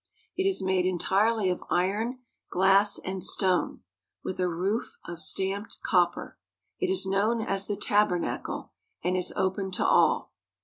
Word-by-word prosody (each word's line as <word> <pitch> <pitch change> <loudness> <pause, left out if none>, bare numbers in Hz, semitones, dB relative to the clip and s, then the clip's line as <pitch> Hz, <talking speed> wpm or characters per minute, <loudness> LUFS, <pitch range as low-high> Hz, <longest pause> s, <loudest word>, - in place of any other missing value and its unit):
It 380 +1 0
is 385 - 0
made 185 -1 +1
entirely 195 +3 +1
of 180 - -4
iron, 215 +8 -1 0.3
glass, 195 +3 +4
and 190 0 -5
stone, 185 0 +1 0.4
with 185 - -5
a 180 -1 +1
roof 190 +7 -2
of 170 -1 -7
stamped 195 +3 -1
copper. 175 -3 0 0.4
It 375 - 0
is 380 - +2
known 205 +4 +1
as 195 -3 -2
the 205 - -2
tabernacle, 205 -4 0 0.3
and 180 +2 0
is 180 -1 0
open 190 +1 -1
to - - -1
all. - - +3
190 Hz, 145 wpm, -27 LUFS, 185-210 Hz, 0.4 s, glass